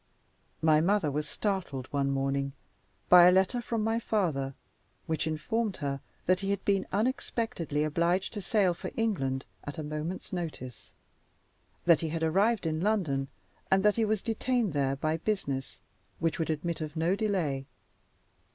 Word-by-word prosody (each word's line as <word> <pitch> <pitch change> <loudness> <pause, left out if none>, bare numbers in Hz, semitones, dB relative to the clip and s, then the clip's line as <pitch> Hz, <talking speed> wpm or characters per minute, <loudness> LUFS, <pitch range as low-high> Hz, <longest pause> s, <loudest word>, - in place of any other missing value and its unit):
My 155 -1 +5
mother 180 -3 +2
was 150 +1 -2
startled, 185 - -2
one 140 -1 +1
morning, 135 0 0 0.5
by 180 -1 +9
a - - +8
letter 190 +6 +3
from 230 -2 -2
my 225 +1 +1
father, 155 - -1 0.5
which 160 0 -1
informed 195 +7 -1
her 140 -2 -3 0.2
that 185 +1 +3
he 195 0 -3
had 200 -1 -1
been 195 -2 +2
unexpectedly 220 - -1
obliged 170 +4 +1
to 210 - -4
sail 195 -2 +2
for - - -6
England 135 - 0 0.2
at 145 +3 -7
a 155 - -3
moment's 155 +6 -5
notice; 155 -9 -6 0.9
that 170 -2 +6
he 165 - -2
had 165 +1 -2
arrived 195 +6 +2
in 160 0 -1
London, 165 -10 0 0.4
and 190 0 +4
that 210 - +5
he 230 - +2
was 215 -2 0
detained 230 - 0
there 135 -2 +1
by 155 +3 0
business 140 -9 -3 0.4
which 165 0 -1
would 160 - -1
admit 160 +2 -2
of 155 0 -5
no 165 +4 +2
delay. 170 -11 -1
170 Hz, 160 wpm, -30 LUFS, 150-205 Hz, 0.9 s, by